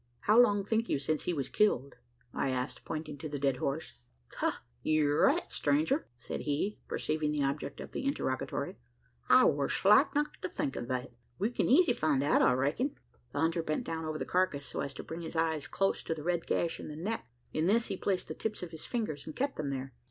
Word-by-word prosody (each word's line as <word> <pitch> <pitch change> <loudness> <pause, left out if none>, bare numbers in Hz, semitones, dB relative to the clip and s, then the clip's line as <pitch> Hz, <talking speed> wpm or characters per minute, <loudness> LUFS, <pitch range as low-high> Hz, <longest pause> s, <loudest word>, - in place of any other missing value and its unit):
"How 215 +3 +5
long 205 -4 +3
think 225 +2 0
you - - +2
since 150 +2 -1
he - - +1
was 140 -3 -1
killed?" 140 -11 +1 0.4
I - - 0
asked, 130 +1 -3
pointing 155 -2 -5
to 155 - -5
the 145 - -3
dead 135 -2 +1
horse. 140 - -2 0.4
"Ha! - - -1 0.2
ye're 150 -2 +2
right, - - +3
stranger!" 145 -4 +1
said 120 - -5
he, 155 +8 -1
perceiving 155 -1 -1
the 150 -1 0
object 140 +1 -2
of - - -7
the - - -4
interrogatory. 130 - -2 0.5
"I - - +8
war 140 -1 +2
slack 235 +10 +5
not 295 +1 -1
to 185 - -2
think 135 - -2
o' - - -3
that. 125 0 -3 0.3
We 210 +5 0
kin - - 0
easy 300 +1 +6
find 150 - +1
out, 145 - +4
I - - +5
reck'n." 145 - 0 0.4
The - - -2
hunter 165 +1 +2
bent 155 -1 -1
down 160 0 -3
over 155 0 -2
the - - -3
carcass, 180 -6 +1
so - - -5
as 140 - -2
to - - -6
bring 165 +1 -6
his 165 0 -6
eyes 160 -1 0
close 195 +1 +1
to 165 - -2
the 150 - -7
red 170 0 0
gash 170 -1 0
in - - -7
the 150 - -6
neck. 205 +8 -3 0.3
In 155 +2 +1
this 230 +4 +4
he - - -3
placed 190 0 -1
the - - -4
tips 215 -4 -4
of 175 - -6
his 160 - -7
fingers, 210 - -3
and 155 - -6
kept 275 +1 -1
them 150 -2 -2
there. 135 -1 -4
155 Hz, 225 wpm, -32 LUFS, 140-195 Hz, 0.5 s, I